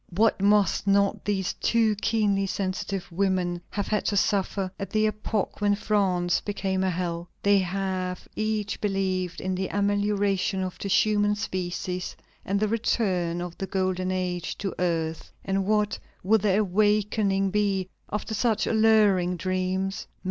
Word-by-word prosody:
What 215 0 +3
must 205 0 +3
not 200 0 +2
these 200 -2 0
two 225 -2 +2
keenly 205 -2 +1
sensitive 195 0 -3
women 180 -1 0
have 205 -1 -2
had 210 - +1
to 205 - +1
suffer 195 -1 0
at 195 - -4
the 215 0 +2
epoch 215 -1 -2
when 205 0 +3
France 190 -4 +1
became 190 -2 -2
a 190 - +2
hell? 175 -1 -3
They 200 0 +5
have 185 -1 -2
each 215 -1 -2
believed 190 -3 -1
in 190 0 -2
the 185 +1 -1
amelioration 200 -1 0
of 185 -1 -5
the - - -4
human 205 +1 +3
species 180 -2 -3 0.3
and 200 +1 0
the 215 - +2
return 185 -6 0
of 175 -1 -6
the 195 - -3
golden 185 -1 -1
age 180 -2 -2
to 195 -2 -3
earth, 165 -2 -1
and 195 0 0
what 210 -1 +1 0.2
will 220 +4 +4
their 205 0 +2
awakening 205 0 +2
be, 200 -2 +1 0.2
after 210 +1 -3
such 220 0 +1
alluring 210 -5 +3
dreams? 185 +2 -2
195 Hz, 150 wpm, -26 LUFS, 185-210 Hz, 0.3 s, They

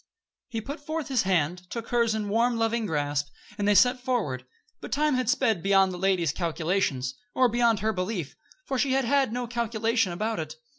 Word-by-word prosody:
He 225 -3 -3
put 285 +7 -6
forth 310 +1 -4
his 260 -4 +2
hand, 180 +1 0
took 230 -1 -6
hers 235 -2 +2
in 215 -1 -2
a - - -5
warm, 230 +3 +2
loving 225 0 0
grasp, 145 -3 -1 0.3
and 205 - 0
they 205 - +4
set 250 +4 +5
forward; 205 - -2 0.3
but - - -9
time 300 +1 +2
had 255 -2 0
sped 235 -8 +2
beyond 195 0 +4
the 180 - -6
lady's 180 -5 +2
calculations, 160 -5 -1 0.2
or 255 - +5
beyond 235 -2 +2
her 220 +1 +1
belief, 185 -5 -3 0.3
for 265 - -2
she 270 -1 +2
had 270 -1 +2
had 270 -2 +2
no 245 +1 -2
calculation 230 -3 0
about 215 +4 -2
it. 155 0 -5
220 Hz, 200 wpm, -27 LUFS, 180-245 Hz, 0.3 s, set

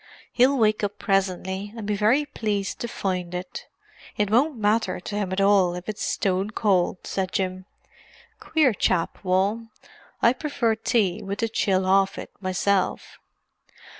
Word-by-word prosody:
"He'll 260 +3 +4
wake 215 -2 +2
up 205 0 -2
presently 195 +1 -1
and 220 - -5
be 210 0 0
very 225 +9 +3
pleased 205 -7 -3
to 235 - -3
find 180 -5 -3
it; 180 +1 -6 0.5
it 210 -1 0
won't 265 +5 +3
matter 215 0 +1
to 195 +3 -6
him 200 -3 -2
at 190 - -1
all 195 -3 +4
if 180 0 -8
it's 215 -1 -5
stone 190 +1 0
cold," 195 -5 0
said 190 -1 -2
Jim. 185 0 -2 0.7
"Queer 305 -7 +2
chap, 180 -4 0
Wal. 195 +5 +1 0.5
I 235 - +4
prefer 260 -5 0
tea 215 -4 0
with 200 +1 -4
the 230 - 0
chill 190 -3 +1
off 195 +1 +3
it, - - -7
myself. 185 0 -1
200 Hz, 155 wpm, -24 LUFS, 185-220 Hz, 0.7 s, He'll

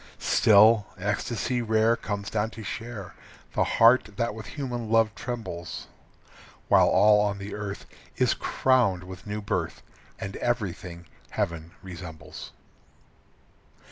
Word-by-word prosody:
Still, 110 0 +5
ecstasy 110 +5 -1
rare 110 0 +3
Comes 100 -3 -5
down 110 0 0
to 110 - -7
share 100 +1 -6 0.4
The - - +2
heart 115 +1 +5
that 115 -2 0
with 110 0 -9
human 120 -6 -4
love 115 -1 +3
trembles; 115 -10 -6 0.8
While - - +6
all 105 +3 +5
on 100 -1 0
the 100 +1 -7
earth 105 -1 -5 0.3
Is - - +3
crowned 120 -9 +1
with 95 +1 -10
new 105 +1 -3
birth 100 - -2 0.4
And 95 0 -5
everything 95 -7 -3 0.2
heaven 85 0 -3
resembles. 85 -4 -9
105 Hz, 120 wpm, -27 LUFS, 95-115 Hz, 0.8 s, While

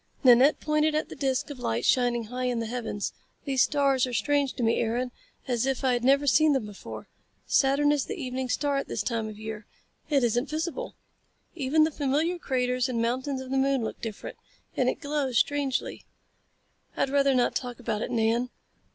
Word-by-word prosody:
Nanette 255 +3 +6
pointed 305 0 +1
at 310 - -1
the - - -8
disc 270 +1 -1
of 275 - -8
light 115 - -1
shining 245 -2 +2
high 250 +3 -4
in 250 -1 0
the 230 - -2
heavens. 225 -3 -4 0.3
"These 270 -3 +1
stars 275 -3 +2
are - - -5
as 245 - -1
strange 285 -2 +1
to 245 - -4
me, 225 0 +2
Aaron, 240 +2 -1 0.4
as 245 0 0
if 270 -1 -1
I 260 -1 +3
had 240 -1 -1
never 275 +3 +4
seen 305 +2 +4
them 265 -5 0
before. 205 -2 -9 0.4
Saturn 280 +2 +3
is 290 -2 +1
the 430 - -6
evening 255 -2 -3
star 280 +2 0
at 275 - -2
this - - -2
time 225 -2 -2
of 215 - -9
year. 220 -1 -7 0.4
It 280 -4 +3
isn't 240 +3 +1
visible. 335 +11 -3 0.6
Even 310 0 +2
the 315 - +1
familiar 305 +5 0
craters 250 -2 0
and 240 -2 -1
mountains 260 +4 -1
of 260 0 -8
the 270 - +2
moon 270 -2 +1
look - - -5
different. 220 -3 -6 0.4
And - - +2
it - - -4
glows 285 -5 -1
strangely." 285 -1 0 0.9
"I'd 270 - 0
rather 275 -1 +3
not 245 - +2
talk 245 -1 -4
about 220 -3 -2
it, - - -3
Nan." 230 +2 +1
260 Hz, 200 wpm, -27 LUFS, 240-285 Hz, 0.9 s, Nanette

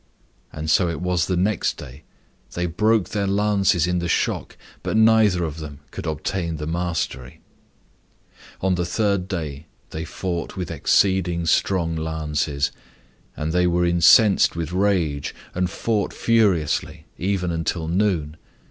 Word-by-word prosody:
And 80 0 -6
so 85 +3 +3
it 85 - -4
was 90 -1 0
the 90 - 0
next 95 +1 0
day; 65 +2 -10 0.5
they 90 - -1
broke 105 +4 +1
their 100 -2 -1
lances 100 -3 +2
in 90 0 0
the 85 - -2
shock, - - -1 0.2
but - - -1
neither 110 -5 +4
of 80 -1 -4
them 75 -2 -8
could - - -6
obtain 85 +1 -2
the 75 - -5
mastery. 80 -7 -3 1.2
And 95 -1 +2
the 90 - 0
third 100 -1 0
day 80 -5 -5 0.2
they 80 - -4
fought 85 0 -4
with 90 -3 -4
exceeding 90 -3 +2
strong 85 0 +1
lances. 75 -2 -1 0.7
And 80 +1 -2
they 90 0 +3
were 90 0 +2
incensed 85 +5 +5
with 85 -1 -3
rage, 90 -7 0 0.2
and 90 0 0
fought 105 +1 -1
furiously, 100 -10 +1
even 90 -1 -1
until 80 0 -2
noon. 85 -4 0
90 Hz, 140 wpm, -22 LUFS, 80-95 Hz, 1.2 s, incensed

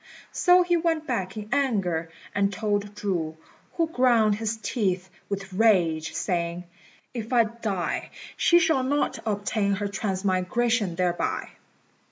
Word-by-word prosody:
So 360 -1 +5
he 350 0 +2
went 325 -2 0
back 190 - -2
in 210 -1 -5
anger 195 -12 0 0.2
and 200 0 +1
told 205 -1 -2
Chu, 170 -6 -2 0.4
who 330 -1 +1
ground 240 -7 +4
his 225 0 -2
teeth 195 -4 -1 0.2
with 195 -1 -4
rage, 175 -7 +2
saying, 170 -1 -1 0.5
"If 230 -1 -5
I 240 -2 +5
die, 215 -5 -3 0.3
she 345 - +5
shall 325 -5 +3
not 285 +3 0
obtain 205 0 0
her 205 +1 -2
transmigration 195 +1 0
thereby." 175 -1 -1
205 Hz, 130 wpm, -26 LUFS, 185-240 Hz, 0.5 s, So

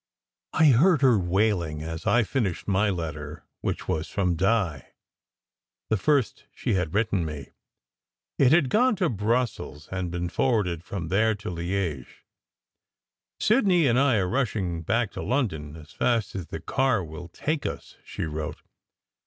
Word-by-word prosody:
I 155 -1 +5
heard 145 +5 +4
her 125 -6 +5
wailing 90 -4 0
as 80 0 -6
I 120 0 +4
finished 105 -5 -2
my 100 +1 +2
letter, 75 -5 -5
which - - -3
was 80 0 -1
from 90 -3 0
Di: 95 - 0 1.0
the - - +5
first 140 +3 +1
she - - -1
had 90 -2 -1
written 105 -4 +1
me. 75 -3 -6 0.9
It 135 -2 +5
had 155 -5 +4
gone 245 +1 +4
to 180 -3 +1
Brussels 110 -8 -2
and 95 -2 -2
been 85 0 -3
forwarded 95 -9 0
from 85 -2 -5
there 110 +4 +2
to 100 -2 -6
Liege. 85 -6 -4 1.1
"Sid 220 0 +3
ney 175 -4 +4
and 125 -1 +3
I 135 -3 +4
are 95 -4 +1
rushing 95 -8 -1
back 110 +5 0
to - - -6
London 80 - -2
as 80 -1 -13
fast 115 -5 0
as 90 -4 -5
the - - -6
car 130 -7 +1
will 80 +1 -8
take 145 - -2
us," - - -7
she - - -5
wrote. 75 -1 -5
100 Hz, 155 wpm, -26 LUFS, 85-125 Hz, 1.1 s, I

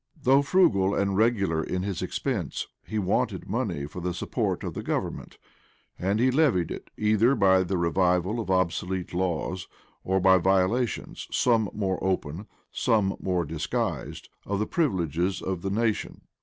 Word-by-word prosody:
Though 135 0 +4
frugal 100 - +3
and 100 -1 0
regular 100 -7 +2
in 90 0 -2
his 100 -3 -3
expense, - - -2 0.2
he 110 - -5
wanted 95 -3 0
money 70 - -2
for 85 +5 -8
the 90 0 -2
support - - -2
of - - -4
government; - - -3 0.6
and 100 +4 0
he 130 +2 +4
levied 125 - +2
it, - - -7
either 110 +5 +3
by 95 -4 +4
the 95 +1 -1
revival 90 +4 +1
of 110 - -4
obsolete 95 0 -1
laws, 90 0 -2 0.4
or 95 +1 +1
by 95 0 +5
violations, 95 +7 0
some 115 -4 +2
more 95 -3 -2
open, 95 0 -2 0.2
some 105 -4 +1
more 90 -2 0
disguised, 75 +1 -3 0.2
of 100 - -2
the 105 - 0
privileges 95 - 0
of 95 -2 -3
the 95 - -2
nation. 110 +1 -1
95 Hz, 150 wpm, -26 LUFS, 90-110 Hz, 0.6 s, by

